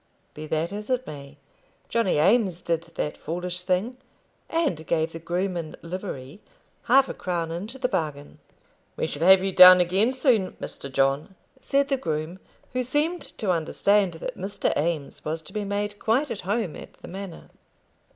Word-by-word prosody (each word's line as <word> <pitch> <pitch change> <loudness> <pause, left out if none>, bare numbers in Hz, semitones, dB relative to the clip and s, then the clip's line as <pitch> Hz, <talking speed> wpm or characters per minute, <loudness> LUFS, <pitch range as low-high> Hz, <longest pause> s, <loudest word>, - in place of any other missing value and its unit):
Be 155 +1 -8
that 160 +3 -1
as 210 +2 -6
it 255 0 0
may, 140 -1 -9 0.5
Johnny 230 -8 +1
Eames 190 +1 +3
did 170 -1 -1
that 150 - -2
foolish 180 +2 -4
thing, 185 +7 -1 0.5
and 245 - -1
gave 160 0 +1
the 165 - -7
groom 180 +3 -2
in 165 -3 -5
livery 170 -3 -6 0.4
half 265 +2 +5
a - - -4
crown 170 -3 -3
into 205 +10 -5
the 260 -1 0
bargain. 150 - -3 0.6
"We - - -1
shall 160 +4 -1
have 190 0 +8
you 195 - 0
down 185 0 +10
again 190 +7 +3
soon, 250 -7 +2
Mr. 140 - -7
John," 135 +7 +1 0.2
said 280 +1 +1
the 275 - +2
groom, 160 -4 -3 0.3
who 255 - 0
seemed 300 +7 0 0.2
to 200 -4 0
understand 180 +3 +2
that 245 +10 -5
Mr. 195 +2 -1
Eames 155 -2 -2
was 160 +1 -3
to 155 - -8
be 210 -1 -2
made 205 +1 -3
quite 260 +6 +1
at 205 - -4
home 205 -2 -1
at - - -11
the - - -13
manor. 190 -1 -8
185 Hz, 170 wpm, -25 LUFS, 160-215 Hz, 0.6 s, down